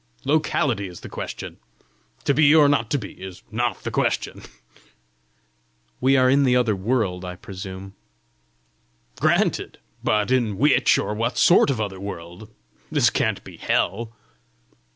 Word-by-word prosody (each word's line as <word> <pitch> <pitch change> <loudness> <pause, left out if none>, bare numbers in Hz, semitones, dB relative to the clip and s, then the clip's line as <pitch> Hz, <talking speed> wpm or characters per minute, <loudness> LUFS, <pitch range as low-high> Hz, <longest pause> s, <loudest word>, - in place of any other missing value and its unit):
Locality 140 - +1
is 90 -1 -11
the - - -9
question! - - -7 0.7
To 140 - +2
be 150 +1 +5
or 150 -2 +7
not 130 -6 +1
to 145 - +1
be, 115 - -7
is 95 -1 -9
NOT 120 +1 -2
the - - -4
question!" - - -1 1.6
"We 135 +1 +3
are 130 0 +4
in 140 +2 +4
the 125 -2 +3
other 120 -4 +2
world, 95 -3 -1
I 90 0 -6
presume!" 95 +1 -9 1.3
"Granted! - - +1 0.3
but 105 +2 +1
in 115 -6 +1
which 145 +6 +4
or - - -2
what 115 +3 -2
sort 175 - +5
of 130 -5 -1
other 100 -3 -3
world? 95 +1 -8 0.4
This - - +3
can't - - -1
be - - -12
hell!" 115 +3 -1
115 Hz, 145 wpm, -23 LUFS, 95-130 Hz, 1.6 s, or